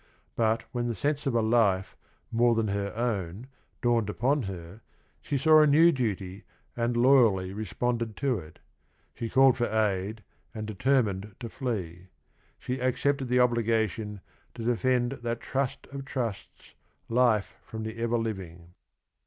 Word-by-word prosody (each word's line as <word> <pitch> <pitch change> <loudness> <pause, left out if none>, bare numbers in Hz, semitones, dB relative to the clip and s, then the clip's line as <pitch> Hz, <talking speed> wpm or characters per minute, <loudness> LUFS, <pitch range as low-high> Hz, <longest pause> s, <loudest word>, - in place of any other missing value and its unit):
But 115 0 +1
when 120 -1 -2
the 120 - -2
sense 145 +6 -1
of 130 - 0
a 115 - +3
life 110 -5 +2 0.4
"more 120 0 +3
than 110 -2 0
her 100 0 -2
own" 110 -3 -2 0.4
dawned 120 -3 +2
upon 135 +7 +1
'feer 95 +1 -8 0.4
she 140 - -2
saw 155 +2 +6
a 150 - +5
new 160 +4 +6
duty 100 - -3 0.3
an 120 0 0
d 120 - 0
Iuya, 115 -8 +4
Hy 105 - -5
icspunded 115 +2 -2
to 135 -4 0
~iE 80 0 -13 0.6
She 115 - -5
called 135 0 +5
tor 120 -1 +1
aid 105 0 -1 0.3
and 110 -1 -4
determined 105 -3 0
to 115 - -6
flee. 95 - -4 0.3
— - - -38
Sfre 125 +1 -3
aeeepted 135 +2 0
the 125 +1 +1
obliga 115 -3 +3
tion 105 +1 -7 0.4
"Lu 115 - -5
defend 120 +1 +1
that 120 0 -2
trust 135 0 -2
of 140 0 -6
trusts, 125 -7 -5 0.3
Life 115 -6 +2
from 110 - -7
i - - -4
the 115 - -11
Ever 115 0 +1
Living." 90 -6 -5
115 Hz, 160 wpm, -28 LUFS, 105-125 Hz, 0.6 s, saw